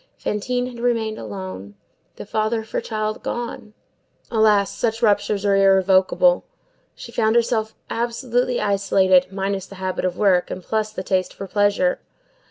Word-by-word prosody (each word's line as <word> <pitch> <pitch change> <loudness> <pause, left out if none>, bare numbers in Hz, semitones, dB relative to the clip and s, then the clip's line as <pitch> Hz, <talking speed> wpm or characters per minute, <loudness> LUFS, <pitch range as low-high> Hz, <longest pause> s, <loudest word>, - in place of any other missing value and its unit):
Fantine 245 +4 -2
had 245 -2 -8
remained 230 -3 -1
alone. 100 -2 -7 0.4
The - - -8
father 215 +2 -1
of 220 - -15
her - - -1
child 215 -1 -3
gone,—alas! 220 -2 -2
such 225 -1 -1
ruptures 205 -1 +2
are 200 -1 +3
irrevocable,—she 195 - +1
found 220 -1 +1
herself 225 -2 +1
absolutely 240 +1 -1
isolated, 195 -2 +3
minus 195 0 -3
the 195 - -12
habit 185 -1 -3
of 180 -1 -2
work 185 -4 +3
and 185 - -6
plus 215 +1 -1
the 190 - -5
taste 185 -1 -1
for 195 - -6
pleasure. 200 -2 +1
210 Hz, 140 wpm, -21 LUFS, 190-230 Hz, 0.4 s, are